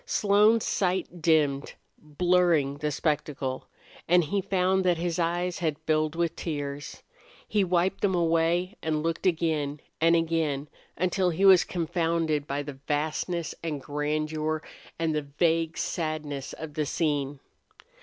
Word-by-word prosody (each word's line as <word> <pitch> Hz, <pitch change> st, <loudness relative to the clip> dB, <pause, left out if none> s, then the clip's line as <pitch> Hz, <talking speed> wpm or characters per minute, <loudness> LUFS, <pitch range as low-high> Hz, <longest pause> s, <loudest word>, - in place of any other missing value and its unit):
Slone's 210 Hz, -, +3 dB
sight 180 Hz, -2 st, -1 dB
dimmed, 150 Hz, -4 st, +2 dB, 0.2 s
blurring 155 Hz, -2 st, +2 dB
the 150 Hz, 0 st, -1 dB
spectacle, 145 Hz, -3 st, -2 dB, 0.4 s
and 175 Hz, +1 st, +5 dB
he 195 Hz, +6 st, -1 dB
found 190 Hz, 0 st, +1 dB
that 180 Hz, -2 st, +2 dB
his 170 Hz, 0 st, -2 dB
eyes 175 Hz, +1 st, -1 dB
had 155 Hz, -4 st, -1 dB
filled 155 Hz, 0 st, +1 dB
with 170 Hz, -1 st, 0 dB
tears. 145 Hz, -3 st, -5 dB, 0.4 s
He 210 Hz, -2 st, +2 dB
wiped 180 Hz, 0 st, +1 dB
them 190 Hz, -2 st, +2 dB
away 170 Hz, +3 st, +1 dB
and 155 Hz, -1 st, -1 dB
looked 165 Hz, +3 st, -1 dB
again 155 Hz, -4 st, 0 dB, 0.2 s
and 165 Hz, +1 st, +5 dB
again, 160 Hz, -4 st, 0 dB, 0.3 s
until 185 Hz, +1 st, +1 dB
he 180 Hz, +4 st, +1 dB
was 190 Hz, -3 st, +8 dB
confounded 165 Hz, -3 st, -1 dB
by 140 Hz, +1 st, -2 dB
the 140 Hz, -2 st, -8 dB
vastness 160 Hz, +3 st, -1 dB
and 155 Hz, -3 st, -2 dB
grandeur 155 Hz, +2 st, -2 dB, 0.3 s
and 165 Hz, -1 st, 0 dB
the 150 Hz, -, 0 dB, 0.2 s
vague 165 Hz, -1 st, +2 dB
sadness 155 Hz, -4 st, -3 dB
of 155 Hz, -2 st, -8 dB
the 150 Hz, -1 st, -1 dB
scene. 145 Hz, -3 st, -1 dB
165 Hz, 135 wpm, -27 LUFS, 150-175 Hz, 0.4 s, was